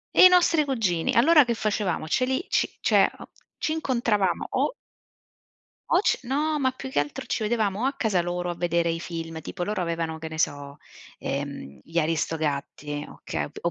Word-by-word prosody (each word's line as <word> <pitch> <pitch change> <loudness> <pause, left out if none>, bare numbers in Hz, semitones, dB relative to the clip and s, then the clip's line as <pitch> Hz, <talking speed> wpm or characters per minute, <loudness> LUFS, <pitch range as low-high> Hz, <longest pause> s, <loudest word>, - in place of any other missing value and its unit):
I 370 - +10
nostri 345 -4 +4
cugini 210 -11 0
allora, 300 +6 +6
che 235 - 0
facevamo, 210 -7 -1
ce 255 - +1
li 265 +6 -1
ci - - +2
cioè, - - +4
uhm, - - -10 0.3
ci 310 - -1
incontravamo 235 - 0
o - - 0 1.2
o - - +5
c - - +2
no, 295 +4 0
ma, 260 -1 +2
più 260 +1 -8
che 260 - 0
altro, 145 - -3
ci 225 - -2
vedevamo 210 -2 0
o - - +1
a 275 - +1
casa 210 -8 +1
loro 175 +1 -3
a 175 - -3
vedere 170 0 +1
i 165 0 -1
film 165 -1 -6
tipo, 175 +3 -5
loro 205 +1 -2
avevano, 165 -2 -2
che 160 0 -6
ne 160 - -7
so, 145 -2 -2 0.4
ehm, 140 - -5
gli 165 - -7
Aristogatti, 150 -2 -1
okay, 75 - -4 0.2
o 170 - +1
180 Hz, 185 wpm, -25 LUFS, 160-255 Hz, 1.2 s, I